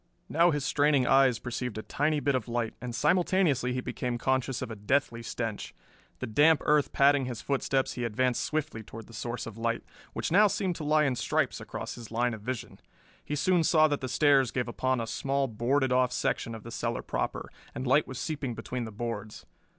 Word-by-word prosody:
Now 170 +3 +4
his 145 -4 -1
straining 145 -2 +3
eyes 135 -2 +4
perceived 120 -1 -4
a 110 - -4
tiny 150 +1 0
bit 140 0 +1
of 125 -3 -1
light, 120 -1 -2
and 125 -2 -5
simultaneously 170 -4 +2
he 125 - -2
became 125 -1 -3
conscious 130 +1 0
of 120 - -6
a - - -5
deathly 115 +3 0
stench. 115 -2 -4 0.4
The - - -4
damp 150 +8 +4
earth 150 -1 +3
padding 140 -1 +4
his 125 -3 -5
footsteps, 135 -1 0
he 125 - -4
advanced 120 +2 0
swiftly 155 -7 -2
toward 110 +1 -10
the 115 - -16
source 120 +1 -4
of 115 -1 -9
light, 115 0 -1 0.3
which - - -3
now 210 +4 +6
seemed 185 -2 -1
to 155 - -6
lie 150 +1 +3
in 135 -3 +1
stripes - - 0
across - - -6
his 115 -2 -10
line 120 +2 0
of 110 - -7
vision. 125 +2 -5 0.4
He 150 - -3
soon 175 +3 +2
saw 155 -1 +5
that 145 - -1
the 130 - -3
stairs 140 -2 +4
gave 125 0 -2
upon 130 +1 0
a 115 - -2
small 135 +4 -1
boarded 130 +4 0
off 125 0 +3
section 115 -2 -1
of 110 - -10
the 115 - -9
cellar - - -3
proper, - - -3 0.2
and 130 - -4
light 140 +4 +3
was 130 - -7
seeping 140 -3 -3
between 120 +2 -4
the 110 - -7
boards. 110 -1 -5
130 Hz, 210 wpm, -29 LUFS, 115-145 Hz, 0.4 s, now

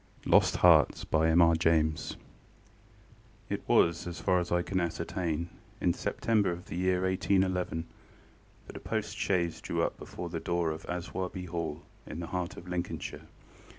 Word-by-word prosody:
LOST - - +5
HEARTS - - +5
It 80 0 -1
was, 85 +1 +3
as 85 - -5
far 90 -2 +2
as 90 - -4
I 90 0 +2
can 95 +1 -1
ascertain, 85 -1 -2 0.3
in - - +2
September 105 -5 +1
of 85 +2 -6
the 80 - -7
year 90 +1 +1
1811 95 -2 +1 0.8
that - - -9
a - - -6
post - - -3
chaise 85 -4 0
drew - - -1
up - - -2
before 90 - -7
the 85 -1 -3
door 85 -2 0
of 80 +1 -7
Aswarby 90 +1 -4
Hall, 85 -3 -4 0.2
in 80 - -6
the 85 - -4
heart 90 +1 -4
of 90 - -10
Lincolnshire. 90 -1 -4
85 Hz, 145 wpm, -30 LUFS, 85-90 Hz, 0.8 s, LOST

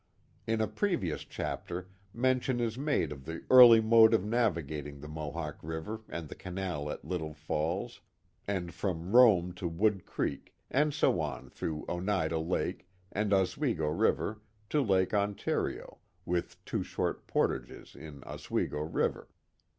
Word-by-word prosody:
In 110 0 +1
a 110 - +1
previous 140 - -1
chapter 90 +1 -5 0.2
mention 130 +1 +1
is 115 -2 -1
made 140 - 0
of 70 -2 -8
the 80 +2 -6
early 120 -3 +10
mode 110 0 +6
of 100 - 0
navigating 80 - -1
the 75 - -9
Mohawk 75 0 -5
River 80 +8 -5
and 85 -2 -5
the - - -8
canal 90 -5 -4
at - - -6
Little 80 -4 -4
Falls, 80 +9 -3 0.5
and 90 -4 -2
from 90 +2 -3
Rome 100 -8 +6
to 90 0 -4
Wood 95 +3 0
Creek, 70 - -3 0.2
and 150 +3 +3
so 145 - +2
on 75 -3 -5
through 75 -2 -4
Oneida 85 -3 0
Lake 85 +2 -2 0.2
and 105 0 -1
Oswego 95 - +1
River 105 +7 0 0.3
to 150 - +3
Lake 95 -6 +2
Ontario, 100 -1 -1 0.3
with 90 -1 -2
two - - -2
short - - -3
portages - - -2
in 75 -3 -10
Oswego - - -3
River. 80 +2 -1
90 Hz, 145 wpm, -31 LUFS, 80-110 Hz, 0.5 s, early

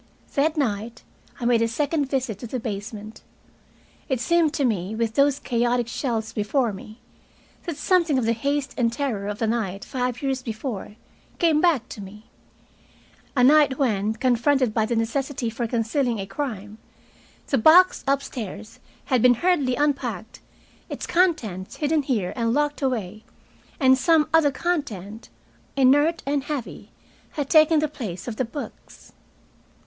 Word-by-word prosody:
That 310 +3 +1
night 230 -3 -2 0.4
I 240 - -4
made 235 -1 +3
a 230 - +3
second 285 +4 -1
visit 255 -7 -2
to 240 - -7
the 255 +3 -4
basement. 215 0 -6 0.9
It 260 -3 0
seemed 340 +2 +2
to 280 - +1
me, 205 -3 -1
with 225 -1 -1
those 280 +2 +3
chaotic 240 -2 0
shelves 225 -3 -3
before 225 +2 0
me, 215 +4 -11 0.7
that 335 -4 -4
something 340 -6 +2
of 250 - 0
the 230 - +2
haste 280 +4 -2
and 230 -2 +2
terror 230 -6 -3
of 210 +3 -3
a - - +3
night 215 -4 -2
five 250 0 -3
years 270 -1 -1
before 220 -3 -5 0.4
came 320 -3 +3
back 300 -9 +2
to 210 - -8
me, 210 +3 -12 1.1
a 250 - +4
night 285 0 +5
when, 215 -6 +1
confronted 255 0 +2
by 220 -1 +1
the 235 - -1
necessity 240 +2 -2
for 235 +1 -3
concealing 235 +2 0
a 195 - -4
crime, 210 -1 -5 0.7
the 270 - +1
box 355 +9 +6
upstairs 225 -6 -3 0.3
had 255 -4 +1
been 245 0 +6
hurriedly 285 -4 +1
unpacked, 245 -6 -2 0.5
its - - -5
contents 245 - 0
hidden 300 0 +1
here 235 -10 -1
and 230 -1 0
locked 295 0 0
away, 215 -6 -2 0.6
and 260 -2 +5
some 320 +1 +3
other 320 -3 +5
content, 235 - -4 0.5
inert 290 +5 +3
and 280 0 -1
heavy, 290 -5 -5 0.4
had 290 -3 -3
taken 310 0 +6
the 305 0 +2
place 225 - -7
of 225 -3 -5
the 260 - 0
books. 275 +5 -10
250 Hz, 155 wpm, -24 LUFS, 220-285 Hz, 1.1 s, box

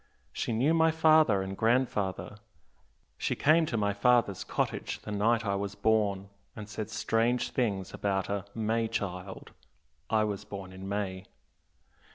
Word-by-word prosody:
She - - -2
knew 130 +8 +2
my 160 0 +4
father 155 -10 +4
and 95 0 -5
grandfather 110 -4 0 0.8
she - - -1
came 160 +2 +4
to 120 - -2
my 100 -1 +1
father's 105 -2 +2
cottage - - -2
the 105 - -6
night 115 +3 +1
I 100 - 0
was 100 0 -3
born, 100 -2 +1 0.3
and 105 -2 -8
said 105 0 -5
strange 115 +2 0
things 100 -7 -1
about 95 -2 -1
a 100 -1 -3
'May 115 +1 0
child' 95 -2 -5 0.6
I 110 -1 +3
was 105 -1 -3
born 95 -3 -8
in 95 +1 -8
May. 95 -2 -3
105 Hz, 150 wpm, -29 LUFS, 100-115 Hz, 0.8 s, my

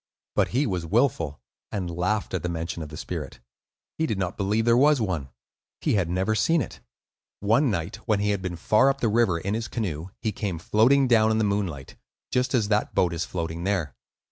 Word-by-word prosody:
But - - +3
he 135 +5 +1
was 90 -7 -2
wilful, 85 - +1 0.3
and 95 -4 -2
laughed 100 +4 -1
at 95 - -1
the 90 - -2
mention 85 0 -4
of 75 - -6
the 75 - -9
spirit. - - -6 0.6
He 160 - +2
did 110 - -1
not 95 0 -2
believe 105 +3 0
there 120 0 +5
was 145 +3 +5
one; 90 - -2 0.5
he - - 0
had 95 -6 +1
never 95 +5 +1
seen 165 +9 +3
it. 125 - -5 0.6
One 115 +7 +3
night 85 -2 -2
when 110 -3 +2
he 105 0 +1
had 100 -2 -1
been 90 -2 -3
far 110 +10 +3
up 135 0 -1
the 120 - +1
river 110 -5 +3
in 100 +4 -3
his 110 0 -2
canoe, 90 -8 -3
he 110 - -1
came 100 -4 -3
floating 125 +10 +3
down 110 -3 +4
in 110 - +2
the 110 - +2
moonlight, 95 -10 -2 0.3
just 125 +1 +1
as 110 -4 +2
that 105 0 0
boat 85 -2 +2
is 85 0 -2
floating 85 -1 -4
there. 95 -8 -1
100 Hz, 215 wpm, -25 LUFS, 85-115 Hz, 0.6 s, there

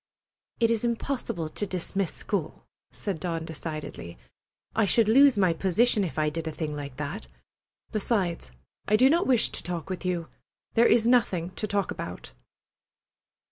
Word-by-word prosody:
"It 230 -1 +3
is 230 -1 0
impossible 235 - -2
to 205 +6 -3
dismiss 190 +1 -2
school," - - -4 0.2
said 195 -6 -4
Dawn 165 -2 -3
decidedly. 155 - -6 0.6
"I 220 -2 +3
should 225 +2 +4
lose 265 +2 +6
my 185 -4 +4
position 205 +5 +2
if 170 - -4
I 155 -1 +1
did 165 +1 -4
a - - -2
thing 155 -1 -4
like 140 -3 -7
that. 150 +9 -5 0.6
Besides, 195 - -1 0.4
I 210 - +4
do 255 +5 +6
not 340 +2 +2
wish 250 -4 +3
to - - -3
talk 175 0 -4
with 185 - -4
you. 175 -3 -1 0.5
There 235 +1 +5
is 230 -2 +4
nothing 195 -8 +2
to 215 - -4
talk 200 -1 0
about." - - -7
190 Hz, 160 wpm, -27 LUFS, 165-230 Hz, 0.6 s, lose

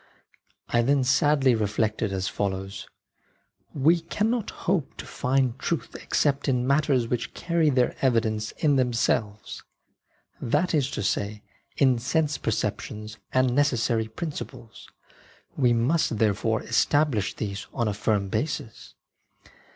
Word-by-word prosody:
I 120 - +3
then 135 +2 +2
sadly 140 0 +3
re 110 -2 +1
flected 110 0 -1
as 95 -1 -2
follows: 95 0 -3 0.4
" - - -41
We 170 +2 +6
cannot 215 +7 -1
hope 170 -6 -2
to - - -7
find 130 -1 0
truth 170 - -2
C - - -9
except 145 -1 0
in 125 -2 +1
matters 140 -3 +2
which 120 0 -3
carry 170 -3 +1
their 125 -3 +2
evidence 110 -4 +1
in 145 -3 +2
themselves 115 -4 -1 0.4
— - - -37
that 175 +5 +1
is 140 -4 +2
to - - -2
say, 105 +1 -2 0.3
in 130 -4 +4
sense 150 +3 0
perceptions 105 0 -3
/ - - -47
and 130 -1 +2
necessary 120 -5 +1
principles; 120 -3 -7 0.7
we 125 -3 +3
must 120 +1 +1
therefore 110 +1 +1
~V/M - - -12
establish 130 -4 +2
these 100 -2 -5
on 115 - -1
a 105 - 0
firm 105 -1 0
basis. 110 0 -4
125 Hz, 140 wpm, -26 LUFS, 110-145 Hz, 0.7 s, We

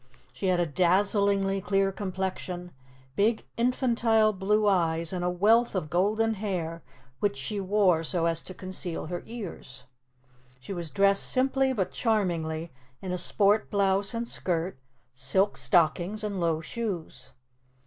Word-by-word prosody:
She 195 - -3
had 180 -1 +2
a 175 - +2
dazzlingly 195 +3 +2
clear 195 0 +1
complexion, 185 -2 -4 0.4
big 215 +5 +1
infantile 235 -3 +2
blue 210 +2 +1
eyes, 165 -3 +1
and 180 -1 -2
a 180 - +1
wealth 215 +6 +3
of 155 -5 -3
golden 215 +5 +2
hair 180 -6 -3 0.4
which 205 -9 0
she 170 +10 -3
wore 190 -4 +2
so 165 +1 -1
as 165 -1 0
to 185 - -8
conceal 185 -2 -5
her 175 +2 -4
ears. 180 - -8 0.8
She 165 +10 -7
was 170 -3 -4
dressed 195 +6 +3
simply 265 +1 +2
but 200 -8 -1
charmingly 170 -7 -1 0.3
in 185 - -5
a 180 - -1
sport 205 +4 +2
blouse 200 +1 +1
and 235 +1 -3
skirt, 175 - -2 0.3
silk 190 +10 +1
stockings 175 +5 +1
and 205 -3 -3
low 165 -2 +1
shoes. 190 -1 -5
190 Hz, 140 wpm, -27 LUFS, 175-210 Hz, 0.8 s, wealth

